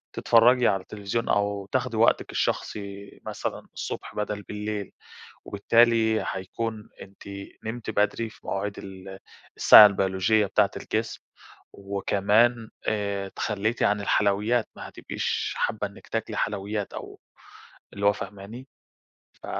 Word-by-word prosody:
تتفرجي 120 Hz, +2 st, +5 dB
على 95 Hz, -, +1 dB
التليفزيون 105 Hz, +4 st, -4 dB
أو 100 Hz, -1 st, 0 dB
تاخدي 125 Hz, -3 st, -1 dB
وقتِك 115 Hz, -, +3 dB
الشخصي 100 Hz, -1 st, -3 dB
مثلًا -, -, -5 dB
الصبح -, -, -6 dB
بدل 105 Hz, 0 st, -3 dB
بالليل، 105 Hz, -1 st, -5 dB, 0.5 s
وبالتالي 110 Hz, +1 st, +3 dB
هيكون 105 Hz, +3 st, -5 dB
أنتِ 95 Hz, 0 st, -13 dB, 0.4 s
نمتِ 115 Hz, +1 st, -5 dB
بدري 105 Hz, +2 st, 0 dB
في 115 Hz, -, -18 dB
مواعيد 100 Hz, +1 st, -3 dB
ال 95 Hz, 0 st, -10 dB, 0.4 s
الساعة 105 Hz, -, +10 dB
البيولوجية 100 Hz, +1 st, +2 dB
بتاعة 95 Hz, -, +2 dB
الجسم -, -, -3 dB, 0.5 s
وكمان 100 Hz, +4 st, +1 dB, 0.2 s
آآ، 100 Hz, -2 st, -1 dB
تخليتِ 110 Hz, +3 st, -2 dB
عن 105 Hz, 0 st, +2 dB
الحلويات 105 Hz, +3 st, +1 dB
ما -, -, -8 dB
هتبقيش -, -, -3 dB
حابة 105 Hz, -1 st, -1 dB
إنِّك 100 Hz, -, -16 dB
تاكلي 110 Hz, -1 st, -3 dB
حلويات 105 Hz, 0 st, -2 dB
أو -, -, -9 dB, 0.7 s
اللي 100 Hz, 0 st, -3 dB
هو 100 Hz, -, +5 dB
فاهماني؟ 100 Hz, +7 st, -9 dB, 0.7 s
ف -, -, -15 dB
105 Hz, 120 wpm, -26 LUFS, 100-110 Hz, 0.7 s, الساعة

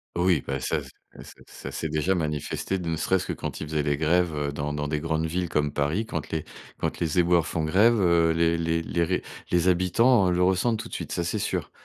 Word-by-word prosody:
Oui, 85 Hz, -4 st, +2 dB
bah, 70 Hz, -1 st, -2 dB
ça 75 Hz, +4 st, -1 dB
ça 65 Hz, -, -13 dB, 0.3 s
ça -, -, -13 dB
ça -, -, -9 dB
s'est 80 Hz, -, -3 dB
déjà 80 Hz, +5 st, +1 dB
manifesté, 75 Hz, +3 st, -2 dB
ne 85 Hz, -2 st, -2 dB
serait-ce 95 Hz, +3 st, +1 dB
que -, -, -3 dB
quand -, -, -5 dB
ils 75 Hz, -, -4 dB
faisaient 75 Hz, -1 st, 0 dB
les 75 Hz, -1 st, 0 dB
grèves, 85 Hz, +3 st, +2 dB
heu, 75 Hz, -1 st, -2 dB
dans 75 Hz, +1 st, -3 dB
dans 75 Hz, 0 st, -2 dB
des 75 Hz, 0 st, -1 dB
grandes 80 Hz, 0 st, -1 dB
villes, 85 Hz, +1 st, -2 dB
comme 75 Hz, -1 st, 0 dB
Paris. 75 Hz, +10 st, 0 dB
Quand 80 Hz, -8 st, -5 dB
les 80 Hz, -1 st, -2 dB, 0.3 s
quand -, -, -3 dB
les 85 Hz, 0 st, -1 dB
éboueurs 85 Hz, -1 st, +3 dB
font 80 Hz, -, -2 dB
grève, 105 Hz, +9 st, +4 dB
heu, 85 Hz, -3 st, +4 dB
les 85 Hz, 0 st, +2 dB
les 80 Hz, 0 st, 0 dB
les 85 Hz, +1 st, 0 dB
ré 90 Hz, +2 st, -1 dB, 0.3 s
les 90 Hz, 0 st, +2 dB
habitants 95 Hz, +4 st, +3 dB
le 90 Hz, 0 st, +2 dB
ressentent 95 Hz, +5 st, +2 dB
tout 115 Hz, +1 st, -6 dB
de -, -, -14 dB
suite, -, -, -5 dB
ça, 85 Hz, -, -1 dB
c'est 95 Hz, +5 st, -2 dB
sûr. -, -, -2 dB
85 Hz, 240 wpm, -26 LUFS, 75-90 Hz, 0.3 s, grève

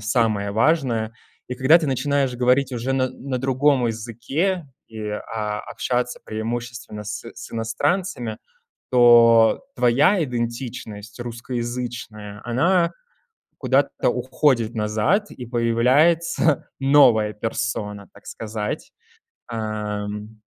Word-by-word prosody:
самое 105 Hz, -2 st, +1 dB
важное. 115 Hz, -2 st, +1 dB, 0.4 s
И 125 Hz, -, -3 dB
когда 130 Hz, +6 st, +5 dB
ты 160 Hz, -, -2 dB
начинаешь 140 Hz, -1 st, 0 dB
говорить 125 Hz, +2 st, +2 dB
уже 125 Hz, +2 st, -2 dB
на 130 Hz, -1 st, +1 dB
на 130 Hz, -1 st, -5 dB
другом 135 Hz, 0 st, +2 dB
языке 125 Hz, -, -2 dB, 0.2 s
и, 110 Hz, -1 st, -9 dB
а, 105 Hz, 0 st, -4 dB
общаться 125 Hz, 0 st, -2 dB
преимущественно 115 Hz, 0 st, -5 dB
с 105 Hz, 0 st, -5 dB
с 115 Hz, -, -10 dB
иностранцами, 115 Hz, -, -1 dB, 0.5 s
то 120 Hz, -, +6 dB
твоя 150 Hz, -, +4 dB
идентичность 115 Hz, -4 st, -5 dB
русскоязычная, 120 Hz, -3 st, -5 dB
она 170 Hz, +9 st, +2 dB, 0.7 s
куда-то -, -, +1 dB
уходит 120 Hz, -6 st, +1 dB
назад 110 Hz, -, 0 dB
и 125 Hz, -, -8 dB
появляется 130 Hz, +7 st, +2 dB
новая 125 Hz, -6 st, +5 dB
персона, 105 Hz, -2 st, -3 dB
так -, -, -17 dB
сказать, 105 Hz, -1 st, -5 dB, 0.6 s
эм. 105 Hz, -1 st, -4 dB
120 Hz, 100 wpm, -22 LUFS, 110-135 Hz, 0.7 s, то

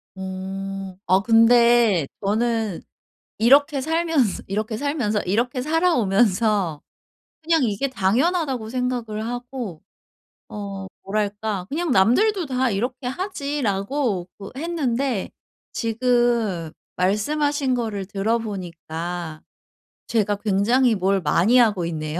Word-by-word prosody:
어. 190 Hz, 0 st, -6 dB
아 185 Hz, +1 st, +5 dB
근데 230 Hz, -, +5 dB, 0.2 s
저는 220 Hz, -1 st, 0 dB, 0.6 s
이렇게 275 Hz, +4 st, +4 dB
살면서 320 Hz, -, 0 dB
이렇게 215 Hz, +2 st, -2 dB
살면서 260 Hz, -8 st, -1 dB
이렇게 240 Hz, +7 st, 0 dB
살아오면서 220 Hz, -, +2 dB, 0.6 s
'그냥 325 Hz, -2 st, +2 dB
이게 225 Hz, +4 st, 0 dB
당연하다.'고 260 Hz, -, 0 dB
생각을 240 Hz, -3 st, -2 dB
하고 245 Hz, -7 st, -6 dB, 0.7 s
어 200 Hz, -2 st, -6 dB, 0.2 s
뭐랄까 205 Hz, -1 st, -2 dB
'그냥 330 Hz, +1 st, -2 dB
남들도 335 Hz, -, +3 dB
다 255 Hz, -1 st, 0 dB
이렇게 245 Hz, +5 st, -3 dB
하지.'라고 265 Hz, -, -2 dB
그 195 Hz, -1 st, -8 dB
했는데 275 Hz, -, -1 dB, 0.4 s
지금 230 Hz, -7 st, 0 dB, 0.2 s
말씀하신 270 Hz, +8 st, +1 dB
거를 220 Hz, -5 st, -2 dB
들어보니까 175 Hz, -6 st, -4 dB, 0.7 s
제가 210 Hz, -3 st, +1 dB
굉장히 220 Hz, +5 st, +2 dB
뭘 195 Hz, 0 st, +1 dB
많이 175 Hz, +10 st, +3 dB
하고 210 Hz, -8 st, +3 dB
있네요. 155 Hz, 0 st, -3 dB
225 Hz, 235 characters per minute, -22 LUFS, 195-255 Hz, 0.7 s, 아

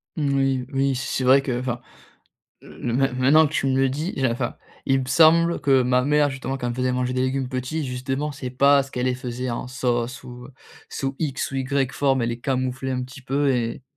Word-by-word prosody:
Oui 135 Hz, -4 st, 0 dB
oui 135 Hz, 0 st, +1 dB
c 135 Hz, -, -3 dB
c'est 130 Hz, -, -1 dB
vrai 135 Hz, +2 st, +6 dB
que 125 Hz, -3 st, -2 dB
enfin 120 Hz, -1 st, -3 dB, 0.8 s
main 125 Hz, +3 st, -1 dB
maintenant 140 Hz, +5 st, +5 dB
que 155 Hz, -, -10 dB
tu 135 Hz, -, 0 dB
me 130 Hz, -, +1 dB
le 135 Hz, 0 st, +3 dB
dis, 150 Hz, +8 st, -3 dB
j'ai 135 Hz, -, +2 dB
enfin, 120 Hz, +1 st, -2 dB, 0.3 s
il 135 Hz, 0 st, +3 dB
me 130 Hz, -, -5 dB
semble 165 Hz, +5 st, +4 dB
que 135 Hz, -2 st, +4 dB
ma 125 Hz, 0 st, +2 dB
mère 145 Hz, 0 st, +3 dB
justement 135 Hz, 0 st, -4 dB
quand 125 Hz, -, -5 dB
elle -, -, -1 dB
me -, -, -6 dB
faisait 130 Hz, 0 st, 0 dB
manger 125 Hz, 0 st, -1 dB
des 130 Hz, -, 0 dB
légumes 130 Hz, 0 st, -1 dB
petit 130 Hz, +4 st, -3 dB
justement 135 Hz, +4 st, -3 dB
c'est 135 Hz, -3 st, -6 dB
parce 140 Hz, +1 st, +3 dB
qu'elle 125 Hz, -1 st, -1 dB
faisait 125 Hz, 0 st, -5 dB
en 120 Hz, +2 st, -4 dB
sauce 125 Hz, 0 st, -2 dB
ou 125 Hz, +1 st, -10 dB, 0.4 s
sous 135 Hz, 0 st, -3 dB
X 140 Hz, -5 st, -2 dB
ou 135 Hz, -, -4 dB
Y 135 Hz, 0 st, 0 dB
forme 135 Hz, -3 st, +1 dB
elle 115 Hz, -, 0 dB
les 120 Hz, -, -4 dB
camouflait 130 Hz, 0 st, -2 dB
un 125 Hz, 0 st, -2 dB
petit 130 Hz, +2 st, -11 dB
peu 140 Hz, +2 st, +1 dB
et, 120 Hz, 0 st, -2 dB
130 Hz, 220 wpm, -23 LUFS, 125-135 Hz, 0.8 s, vrai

